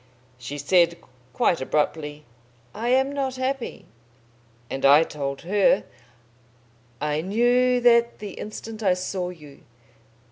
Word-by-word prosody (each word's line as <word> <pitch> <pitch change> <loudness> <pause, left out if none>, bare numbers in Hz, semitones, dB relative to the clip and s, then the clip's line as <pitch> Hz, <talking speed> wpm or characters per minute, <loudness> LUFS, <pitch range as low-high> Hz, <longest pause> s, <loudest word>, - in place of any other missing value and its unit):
"She 130 +4 -6
said, 170 +3 +3 0.3
quite 165 +5 +1
abruptly, 150 +1 -2 0.5
'I 230 +3 -3
am 265 +2 +3
not 270 -2 -2
happy,' 260 -1 -3 0.8
and 135 - -5
I 145 +3 +7
told 140 -3 -5
her, 205 +9 +2 1.2
'I 150 0 -1
knew 245 +6 +2
that 235 -1 +4
the 205 -2 -7
instant 215 +2 -8
I 190 -4 +3
saw 180 0 -3
you.' 150 -6 -13
185 Hz, 115 wpm, -24 LUFS, 150-240 Hz, 1.2 s, I